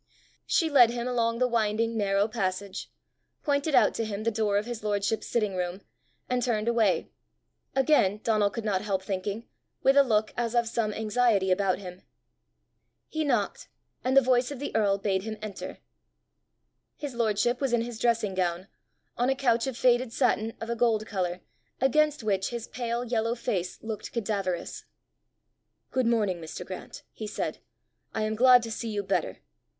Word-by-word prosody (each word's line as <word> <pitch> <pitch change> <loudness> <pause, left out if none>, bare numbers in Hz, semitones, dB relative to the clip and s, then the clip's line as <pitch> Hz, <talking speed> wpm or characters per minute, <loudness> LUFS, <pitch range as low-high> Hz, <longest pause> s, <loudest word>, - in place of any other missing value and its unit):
She 330 - +3
led 265 -6 +6
him 240 +1 -3
along 230 -2 +1
the 255 +1 +2
winding 230 -1 0
narrow 200 -1 +2
passage, 200 -3 -3 0.5
pointed 285 0 +1
out - - +5
to 230 - -2
him 215 -1 -4
the 230 - +1
door 210 -2 +1
of 205 - 0
his 240 -3 -6
lordship's 205 +1 -1
sitting 210 -5 0
room, 180 +1 -3 0.5
and 250 0 0
turned 230 -3 0
away 225 -5 +2 0.6
again, 265 -8 +3
Donal 215 -3 +3
could 225 +2 -6
not 195 -3 +1
help 195 -2 -1
thinking, 200 +4 -3 0.4
with 270 - +5
a 280 - +8
look 215 -5 +1
as 240 0 -1
of 235 -1 +3
some 225 -2 -1
anxiety 215 -3 +2
about 185 0 +2
him. 180 -1 -9 1.1
He 315 0 -1
knocked, 240 -9 0 0.4
and 260 +2 +2
the 275 - +8
voice 250 0 +3
of 285 - -6
the 285 -2 -5
earl 205 -3 +3
bade 195 -1 0
him 220 +1 -5
enter. 215 -2 -7 1.2
His 290 -3 -5
lordship 235 +2 +1
was 270 -3 +1
in 240 -1 +3
his 235 -1 -7
dressing 230 -4 +1
gown, 185 0 -1 0.5
on 245 +2 +2
a 270 - +2
couch 240 -2 +2
of 260 -3 -4
faded 245 -1 +3
satin 225 0 +1
of 225 +1 -4
a - - 0
gold 225 -2 +2
colour, 180 -4 -2 0.4
against 295 +1 +2
which 195 -3 0
his 235 -2 -5
pale 240 -1 -3
yellow 230 -1 0
face 200 -7 -2
looked 220 -2 -5
cadaverous. 195 -6 -2 1.1
"Good 255 -2 +1
morning, 210 -7 +1
Mr. 160 +2 -7
Grant," 185 0 -8
he 215 - -7
said. - - -3 0.6
"I 220 - 0
am 215 0 0
glad 250 +2 +6
to 230 - -5
see 230 +1 -4
you 205 -2 -2
better!" 195 0 -1
225 Hz, 175 wpm, -28 LUFS, 200-240 Hz, 1.2 s, a